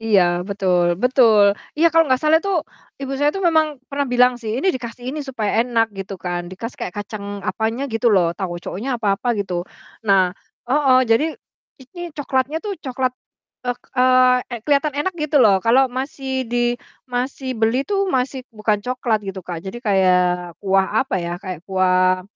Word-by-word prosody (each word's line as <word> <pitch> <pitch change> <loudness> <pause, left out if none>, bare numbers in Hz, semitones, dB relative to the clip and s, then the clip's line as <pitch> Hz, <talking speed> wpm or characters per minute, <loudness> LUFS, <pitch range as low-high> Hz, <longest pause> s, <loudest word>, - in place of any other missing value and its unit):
Iya, 215 -4 +4 0.3
betul 180 -3 +1
betul, 225 -6 +5 0.2
iya 325 +2 +4
kalau 330 0 +5
nggak 260 0 +2
salah 310 +1 +5
tuh 395 +1 -1 0.4
Ibu 275 0 -4
saya 290 +1 +3
tuh 390 - -3
memang 315 -2 +2
pernah 285 0 -1
bilang 250 0 +4
sih, 220 -1 -3
"Ini 385 - +2
dikasih 245 -1 -7
ini 300 +2 -4
supaya 220 -5 -1
enak," 230 -2 +1
gitu 195 +1 -5
kan, 175 -1 -4
dikasih 230 +6 -7
kayak 180 - -4
kacang 200 -1 -7
apanya 225 +5 -1
gitu 225 +2 0
loh 175 -3 +3
tauconya 185 +6 -5
apa 205 -4 0
apa 245 - -3
gitu. 180 -3 -3 0.4
Nah 190 -2 +4 0.4
heeh, 270 -2 +4
jadi 230 +7 +4 0.6
ini 350 +8 -12 0.2
coklatnya 275 +1 -1
tuh 415 - -2
coklat, 260 -2 -1 0.6
eee 245 - 0 0.8
eee, 235 - -6
keliatan 290 0 +1
enak 375 +5 -1
gitu 300 -1 0
loh, 200 -3 +5
kalau 255 +3 +4
masih 265 0 -3
di 245 - -1 0.5
masih 255 +2 -3
beli 225 +4 +2
tuh 395 +1 0
masih 260 -3 -1
bukan 215 -1 0
coklat 250 -3 0
gitu, 195 -1 -5
Kak, 175 -1 -5
jadi 190 +5 -5
kayak 185 -4 +3 0.4
kuah 195 -1 +3 0.2
apa 265 - -4
ya, 170 0 -4
kayak 185 -5 -6
kuah 185 -1 +2
235 Hz, 170 wpm, -20 LUFS, 195-265 Hz, 0.8 s, betul